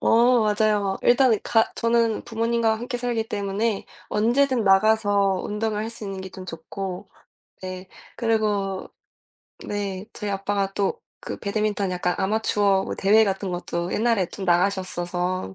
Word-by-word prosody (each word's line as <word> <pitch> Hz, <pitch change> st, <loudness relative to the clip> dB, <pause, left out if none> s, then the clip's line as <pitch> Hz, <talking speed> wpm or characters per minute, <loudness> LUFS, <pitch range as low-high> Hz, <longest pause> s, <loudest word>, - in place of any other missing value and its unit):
어 240 Hz, +1 st, +4 dB
맞아요. 210 Hz, -1 st, +2 dB
막 195 Hz, -1 st, -2 dB
일단은 245 Hz, -3 st, +4 dB
가 225 Hz, -1 st, +3 dB
저는 230 Hz, -1 st, +1 dB
부모님과 230 Hz, 0 st, +1 dB
함께 245 Hz, +2 st, -4 dB
살기 235 Hz, -2 st, -1 dB
때문에 205 Hz, 0 st, -1 dB, 0.2 s
언제든 240 Hz, +2 st, +2 dB
나가서 200 Hz, -1 st, +3 dB
운동을 210 Hz, 0 st, -2 dB
할 225 Hz, -, -4 dB
수 225 Hz, -2 st, -9 dB
있는 195 Hz, -1 st, -5 dB
게 190 Hz, -, -7 dB
좀 185 Hz, 0 st, -9 dB
좋고 185 Hz, +3 st, -6 dB, 0.5 s
네. 185 Hz, 0 st, -7 dB, 0.3 s
그리고 210 Hz, -4 st, 0 dB, 0.8 s
네. 200 Hz, -1 st, -4 dB
저희 210 Hz, -2 st, -4 dB
아빠가 195 Hz, 0 st, -1 dB
또 200 Hz, 0 st, -1 dB, 0.2 s
그 -, -, -5 dB
배드민턴 205 Hz, -1 st, -1 dB
약간 180 Hz, 0 st, -1 dB
아마추어 200 Hz, -1 st, +2 dB
뭐 -, -, -4 dB
대회 215 Hz, +3 st, +5 dB
같은 195 Hz, -1 st, -2 dB
것도 175 Hz, 0 st, -3 dB
옛날에 225 Hz, -3 st, +2 dB
좀 195 Hz, -2 st, -6 dB
나가셨어서 180 Hz, -, 0 dB
205 Hz, 295 characters per minute, -24 LUFS, 190-225 Hz, 0.8 s, 대회